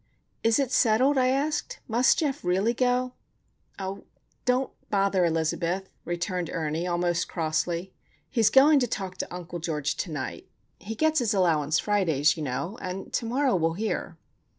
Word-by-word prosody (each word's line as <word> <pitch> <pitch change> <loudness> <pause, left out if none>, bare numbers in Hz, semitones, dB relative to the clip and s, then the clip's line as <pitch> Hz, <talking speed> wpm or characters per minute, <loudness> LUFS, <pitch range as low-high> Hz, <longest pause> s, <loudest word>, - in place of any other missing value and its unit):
"Is 225 0 +4
it 275 -3 0
settled?" 255 +4 +3
I 255 - +3
asked. 280 +4 -1
"Must 240 +3 +3
Geof 290 -3 -1
really 190 +6 +2
go?" 250 0 +1 0.6
"Oh, 195 0 -5 0.4
don't 255 +1 +1 0.2
bother, 195 -2 +2
Elizabeth," 170 +3 -1 0.2
returned 175 0 -2
Ernie, 160 +2 -2
almost 175 -1 0
crossly. 170 +2 -2 0.3
"He's 225 -5 +3
going 285 +2 +6
to 245 - +1
talk 190 -4 -4
to - - -5
Uncle 175 -1 -6
George 150 -3 -2
to 185 - -3
night. 145 -3 -5 0.3
He 220 +2 -6
gets 315 +4 +2
his 230 -4 +1
allowance 160 -5 +2
Fridays, 165 -9 +2
you 160 - -6
know; 150 - -3
and 185 +1 -6
to 230 - -1
morrow 260 +1 +2
we'll 165 -2 +1
hear." 215 +5 -3
190 Hz, 155 wpm, -27 LUFS, 170-245 Hz, 0.6 s, going